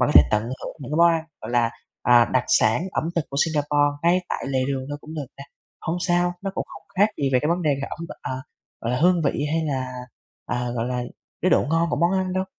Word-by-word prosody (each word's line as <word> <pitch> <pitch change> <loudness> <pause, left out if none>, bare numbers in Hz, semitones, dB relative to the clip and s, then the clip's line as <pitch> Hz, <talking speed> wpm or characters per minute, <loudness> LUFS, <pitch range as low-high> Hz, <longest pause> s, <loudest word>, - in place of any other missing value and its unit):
mà 125 - +4
có 150 - 0
thể - - +11
tận 105 0 +2
hưởng 125 +3 -6
những 135 - -7
cái - - 0
món 170 +1 +7
ăn, 165 -1 0 0.2
gọi - - -6
là, 120 -1 +2 0.3
à, 120 -1 +6
đặc 130 -1 +2
sản 110 +8 +4
ẩm - - -1
thực 165 - +1
của 140 - -4
Singapore 145 -2 +2
ngay 175 +2 +4
tại - - -3
lề 135 -1 0
đường 135 -1 -2
thôi 145 0 -4
cũng 155 +2 -10
được 150 -3 -4
nè. 140 - -8 0.4
Hông 165 - -2
sao, 175 0 +2
nó 195 - -2
cũng - - -2
không - - -11 0.2
khác 205 +2 +6
gì 135 - +2
về 130 - +5
cái 150 - 0
vấn 175 +1 +1
đề 150 - +2
về 140 0 -4
ẩm 165 +2 -6
thực, - - -7
ờ, - - -3 0.5
gọi 115 - -2
là, 125 - 0
hương 175 0 +4
vị 140 - 0
hay 160 0 +1
là, 130 -4 -2 0.5
à, 125 0 -2
gọi 115 0 -1
là, 125 -1 -2 0.4
cái 185 - +3
độ - - +5
ngon 165 0 +2
của - - 0
món 170 +5 +2
ăn 185 -1 0
đâu. 185 0 0
145 Hz, 270 wpm, -24 LUFS, 130-170 Hz, 0.5 s, thể